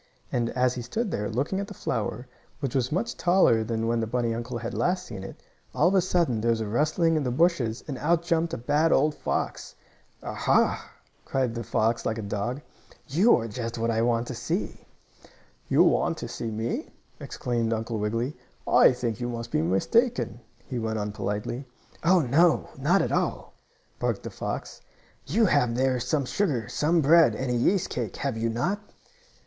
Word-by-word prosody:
And, 120 -1 0
as 125 0 +3
he 125 - -5
stood 205 - -3
there, 105 0 -2
looking 140 - -1
at 200 - -3
the 205 - -9
flower, 115 -1 -3 0.3
which 135 -5 -3
was 130 -2 0
much 190 +9 -1
taller 175 -11 +4
than 115 0 -2
when 115 0 +1
the 115 - -1
bunny 120 0 0
uncle 120 +1 -4
had 115 0 -5
last 180 +1 0
seen 95 - -7
it, - - -10 0.3
all 155 - +4
of - - -1
a 190 - +5
sudden 170 -11 +1
there 115 - +1
was 115 -1 +2
a 110 - -2
rustling 155 - +2
in 155 - +1
the 125 - -1
bushes, 130 -5 +1
and 135 -4 -5
out 170 +2 +2
jumped 170 -1 +1
a - - -3
bad 150 +7 +2
old 150 +3 +3
fox. - - -3 0.5
"Ah, - - -4
ha!" - - +1 0.4
barked 130 -3 +1
the 115 0 -4
fox, 115 +2 0
like 110 - -1
a 110 - -4
dog. 105 +7 -3 0.5
"You 185 - +5
are 115 - -3
just 115 +1 -4
the 115 - -5
one 115 0 +1
I 115 0 +1
want 115 0 +1
to - - -3
see!" - - -4 0.8
"You - - +5
want - - +2
to - - -5
see 115 - -4
me?" 110 +2 -3 0.3
exclaimed 115 -2 -2
Uncle 115 0 -2
Wiggily. 115 +7 -1 0.3
"I - - +6
think 120 -4 -3
you 120 0 -2
must 115 0 -5
be - - +1
mistaken," 120 - +1 0.3
he 125 - -4
went 110 -1 -2
on 105 0 -2
politely. 105 +5 -3 0.4
"Oh, 180 +2 +5
no, 155 +5 +3
not 155 +8 +2
at - - -2
all!" - - -1 0.5
barked - - -1
the - - -6
fox. - - -5 0.5
"You 230 - +3
have 135 - +2
there 130 0 +1
some 140 +3 0
sugar, 135 - -1
some 165 +3 +2
bread 155 -5 +6
and 130 +1 -2
a - - +1
yeast 170 +10 +2
cake; 120 -5 -3
have 135 -3 -2
you 115 +1 -1
not?" 175 - -1
125 Hz, 200 wpm, -26 LUFS, 115-160 Hz, 0.8 s, I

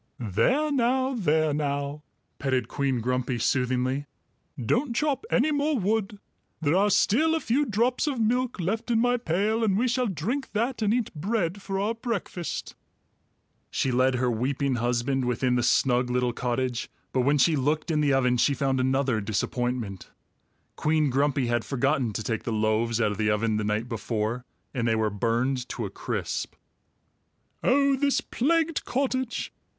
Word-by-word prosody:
"There 250 - +1
now, 260 0 +1
there 155 - +1
now," 145 0 -2 0.4
petted 130 -4 0
Queen 135 -2 -1
Grumpy 125 +1 -1
soothingly. 130 +3 0 0.5
"Don't 235 - 0
chop 300 - 0
any 280 +5 +2
more 290 0 +1
wood. 210 0 -1 0.4
There 155 +1 +1
are 200 +2 +4
still 305 +11 +3
a - - +1
few 285 +2 +1
drops 235 +6 +1
of 275 -5 -1
milk 245 +1 0
left 220 +7 -2
in 230 -2 +3
my 245 +1 +3
pail, 215 +3 0
and 200 -3 +2
we 245 +4 +2
shall 250 0 +1
drink 225 - -3
that 235 +3 -1
and 210 -1 +2
eat 240 -1 0
bread 185 +2 -1
for 195 0 -3
our 210 +3 0
breakfast." 225 -7 -4 1.0
She 130 - 0
led 130 +1 +3
her 125 0 +1
weeping 130 +3 0
husband 125 +3 0
within 125 +1 +1
the 125 - +2
snug 125 +1 +2
little 125 -1 0
cottage, 125 -1 -2 0.2
but 130 - +2
when 140 +4 +3
she 155 +4 +4
looked 150 +4 0
in 155 -1 +2
the 145 -1 +2
oven 125 -2 +3
she 140 +3 +3
found 135 -2 0
another 130 -3 +1
disappointment. 110 0 -2 0.7
Queen 155 -2 +1
Grumpy 140 0 +1
had 120 -1 0
forgotten 135 -2 0
to 110 - -3
take 110 -1 -2
the 115 - -4
loaves 110 +2 +1
out 110 -3 +2
of 105 - -6
the 105 -1 +2
oven 105 +1 +1
the 105 - -1
night 105 +3 -1
before, 115 +1 -3 0.3
and 120 -3 -1
they 115 - +2
were 110 -1 0
burned 120 +4 -1
to 115 - -3
a 95 - -6
crisp. - - -4 1.1
"Oh, 275 +1 +4
this 280 +1 +2
plagued 325 +4 0
cottage!" 260 -2 -2
140 Hz, 165 wpm, -26 LUFS, -, 1.1 s, are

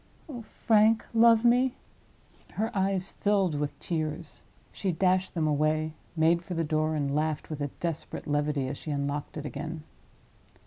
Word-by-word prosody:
Oh, 255 -6 -7
Frank, 220 0 +2
love 230 0 +5
me!" 250 +2 +4 0.8
Her 220 +2 -2
eyes 195 -1 0
filled 200 -5 +1
with 145 0 -3
tears. 155 -2 -4 0.3
She 195 - -2
dashed 185 +2 +1
them 160 -2 +1
away, 155 +1 +1 0.2
made 165 +1 +3
for 180 0 -6
the 165 - 0
door, 155 0 0
and 140 -2 -1
laughed 155 +1 -1
with 150 -1 -4
a 145 - 0
desperate 165 -2 -4
levity, 145 -2 0
as 135 +1 -5
she - - -8
unlocked 145 +1 -3
it 150 - -5
again. 155 +2 -5
160 Hz, 160 wpm, -28 LUFS, 150-195 Hz, 0.8 s, love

